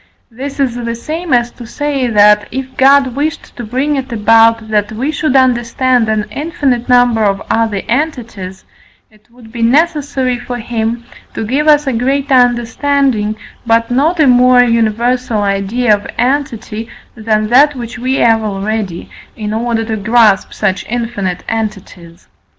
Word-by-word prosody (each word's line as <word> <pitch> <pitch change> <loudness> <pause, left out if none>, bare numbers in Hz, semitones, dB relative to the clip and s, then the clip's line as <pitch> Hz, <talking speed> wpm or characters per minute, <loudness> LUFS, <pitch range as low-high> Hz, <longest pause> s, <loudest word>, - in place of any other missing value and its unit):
This 275 +5 -7
is 265 -4 +1
the 235 -1 -4
same 315 +7 -5
as 240 -1 +2
to 240 - -12
say 280 0 -2
that, 210 -2 +4
if 260 +1 -6
God 270 -1 +4
wished 310 +3 -4
to 240 - -7
bring 260 +6 -1
it 265 -1 -5
about 225 0 +3
that 210 -1 0
we 255 +7 -2
should 305 -2 -1
understand 250 -1 +2
an 215 -1 0
infinite 275 -4 -2
number 245 -3 +3
of 195 -1 +1
other 220 -3 0
entities, 235 -9 -4 0.5
it 215 -1 -26
would 235 -2 -17
be 235 0 -6
necessary 275 -1 +1
for 245 0 -6
him 235 0 -3 0.3
to 225 - -3
give 275 +7 -1
us 295 -1 +4
a 265 - -1
greater 270 +4 0
understanding, 245 -2 +1 0.3
but 230 0 +1
not 305 +7 +1
a 310 - +5
more 250 -1 +5
universal 230 0 0
idea 200 +4 +1
of 205 0 -2
entity 240 -4 -2 0.2
than 215 -1 -1
that 285 +4 +4
which 240 -1 -7
we 255 +2 -1
have 225 -3 +3
already, 205 -3 -4 0.3
in 210 -1 -5
order 225 0 -1
to 220 -1 -3
grasp 215 -1 +2
such 195 -3 -2
infinite 220 -6 -3
entities. 200 -6 -6
240 Hz, 155 wpm, -13 LUFS, 220-260 Hz, 0.5 s, a